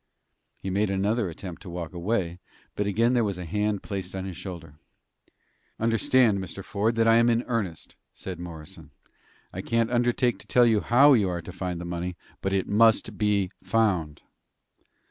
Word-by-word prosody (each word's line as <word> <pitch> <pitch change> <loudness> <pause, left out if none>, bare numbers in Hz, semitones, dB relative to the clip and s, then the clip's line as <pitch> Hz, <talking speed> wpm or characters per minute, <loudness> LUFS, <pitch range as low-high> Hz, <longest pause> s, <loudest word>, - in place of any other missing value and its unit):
He 95 - -5
made 100 +2 +1
another 100 +2 0
attempt 85 0 -8
to 95 - -9
walk 85 -2 -6
away, 90 -1 -2 0.4
but 105 - -1
again 115 +5 +2
there 120 -2 +3
was 100 -4 -2
a 90 - -6
hand 105 +3 -1
placed 95 -2 -5
upon 95 0 -4
his 95 -2 -6
shoulder. 80 -6 -9 1.0
"Understand, 115 -1 +3
Mr. 95 +1 -7
Ford, 105 +4 0
that 115 0 +2
I 115 0 +6
am 115 +1 +4
in 120 +1 +2
earnest," 100 -10 -3 0.2
said 90 -3 -8
Morrison. 80 -3 -9 0.6
"I 95 - -4
can't 115 +3 0
undertake 120 0 +1
to - - -15
tell 125 -1 +5
you 110 -3 +4
how 140 +5 +6
you 105 -7 +3
are 85 -2 -3
to 90 - -8
find 90 -1 -4
the 90 - -6
money, 85 +1 -4 0.2
but 95 - -1
it 95 -1 +1
must 110 0 +3
be 100 -3 +1
found." 90 -10 0
100 Hz, 180 wpm, -26 LUFS, 90-115 Hz, 1.0 s, I